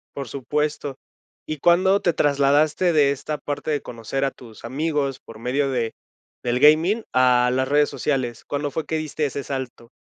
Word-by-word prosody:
Por 140 -4 -5
supuesto. 145 +2 -2 0.5
¿Y 155 - -4
cuándo 185 +5 +4
te 175 - +2
trasladaste 145 +4 +2
de 145 -2 +4
esta 150 +2 -4
parte 145 +1 -5
de 145 -2 0
conocer 120 +4 -4
a 135 - +1
tus 115 -3 -15
amigos, 140 +1 -1
por 110 -1 -13
medio 135 +4 0
de 120 -4 -1 0.5
del 125 0 0
gaming, 165 +9 +5
a 125 -1 +4
las 130 +1 +1
redes 145 +1 +3
sociales? 130 -5 -2
¿Cuándo 145 0 -3
fue 160 - -3
que 160 - -3
diste 155 0 -2
ese 140 0 -3
salto? 130 -3 -6
140 Hz, 175 wpm, -23 LUFS, 130-150 Hz, 0.5 s, gaming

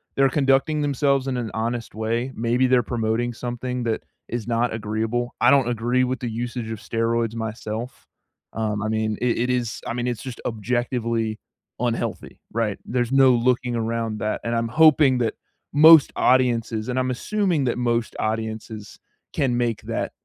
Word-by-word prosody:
they're 135 0 +4
conducting 140 +2 +2
themselves 140 -1 +1
in 130 - -1
an 115 -3 -3
honest 115 +1 -3
way. 115 +4 -2
Maybe 120 +3 +1
they're 125 -1 +3
promoting 115 +1 -1
something 125 +1 -4
that 115 -2 -2 0.3
is 120 -2 -4
not 120 0 0
agreeable. 110 +3 -2
I - - +6
don't 135 -3 +4
agree 120 +2 +1
with 130 0 -1
the 120 -2 -4
usage 120 0 -4
of 110 - -4
steroids 115 0 -1
myself. 110 +2 -5 0.5
Um, 105 -2 -2
I 110 - -1
mean, 110 -1 -1
it 125 -1 +1
it 125 +2 0
is 120 -3 -1
I - - -2
mean, 120 0 -2
it's 120 -4 -3
just 130 -3 -7
objectively 115 -1 -1 0.4
unhealthy, 120 -1 -3
right? 110 -3 -1
There's 120 0 -1
no 135 -1 +6
looking 125 0 +1
around 115 -1 -2
that, 105 +1 -2
and 115 0 -1
I'm 115 0 0
hoping 150 -2 +5
that 115 -3 0 0.4
most 155 0 +8
audiences 120 -3 +2
and 125 +1 0
I'm 130 0 0
assuming 185 - 0
that 120 - 0
most 120 -2 0
audiences 110 -1 -4 0.3
can 130 -3 +1
make 120 -3 -1
that - - -3
120 Hz, 170 wpm, -23 LUFS, 110-125 Hz, 0.5 s, most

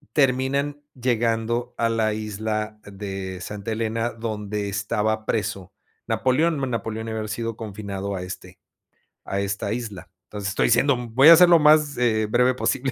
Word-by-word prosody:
Terminan 140 +2 +1
llegando 120 0 -1
a 115 - +2
la 110 -1 +1
isla 110 0 -3
de 95 -2 -6
Santa 105 +4 -5
Elena 115 +1 -1
donde 105 -2 -4
estaba 105 +2 -1
preso 100 -4 -2 0.4
Napoleón, 130 +8 +1
Napoleón 110 0 -3
había 110 -1 -3
sido 115 +1 -3
confinado 100 -2 -5
a 90 - -4
este 90 +1 -9 0.6
a 100 - -3
esta 100 +1 -2
isla. 110 -7 -6 0.2
Entonces 105 -1 -5
estoy 100 - +1
siendo, 125 +3 +4
mm, 120 -2 -8
voy 140 +5 +8
a 170 - +11
ser 180 0 +7
lo 170 - +8
más, 150 -1 +4
eh, 110 -3 +2
breve 125 +2 +3
posible. 135 +1 -1
110 Hz, 155 wpm, -23 LUFS, 105-125 Hz, 0.6 s, a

